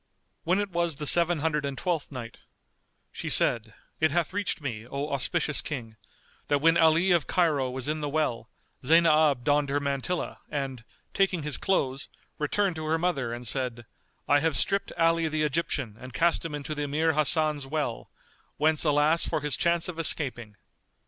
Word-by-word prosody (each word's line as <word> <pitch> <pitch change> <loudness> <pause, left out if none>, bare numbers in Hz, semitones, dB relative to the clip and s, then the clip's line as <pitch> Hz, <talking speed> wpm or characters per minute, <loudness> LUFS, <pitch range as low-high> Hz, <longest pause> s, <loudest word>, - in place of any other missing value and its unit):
When 180 +4 +2
is 205 - -1
was 170 -3 -1
the 150 - -5
Seven 170 0 +4
Hundred 150 -2 0
and 140 -1 -4
Twelfth 165 -3 -2
Night, 120 -4 -8 0.7
She - - -5
said, 110 -2 +2 0.2
It 155 - +3
hath 170 +2 -1
reached 205 -3 -1
me, 115 -6 -5
O 140 +3 -4
auspicious 140 +2 0
King, 115 -7 -6 0.5
that 145 - +2
when 165 +3 +3
Ali 165 +3 +4
of 170 -4 +2
Cairo 155 -8 +1
was 130 0 -4
in 155 +1 -2
the 145 - -2
well, 125 -7 -1 0.3
Zaynab 155 -3 +4
donned 145 0 +2
her 145 +1 +1
mantilla 140 +5 -3
and, 135 -4 -4 0.3
taking 190 -5 +1
his 150 -2 +2
clothes, 135 -8 -1 0.3
returned 180 +4 0
to 155 - -5
her 160 +1 +1
mother 150 -8 -1
and 120 0 -5
said, 120 -1 -1 0.4
"I 145 - +4
have 160 -1 0
stripped 195 0 0
Ali 165 0 +2
the 155 0 -1
Egyptian 140 -6 -1
and 130 0 -10
cast 170 +4 +2
him 165 -3 -4
into 145 +2 -5
the 150 - -4
Emir 155 +3 +1
Hasan's 150 -1 +2
well, 145 -5 -3 0.5
whence 155 0 +2
alas 150 +2 +3
for - - -1
his 150 -1 0
chance 170 -1 +1
of 170 -2 -6
escaping!" 125 -9 -1
150 Hz, 175 wpm, -27 LUFS, 135-165 Hz, 0.7 s, Seven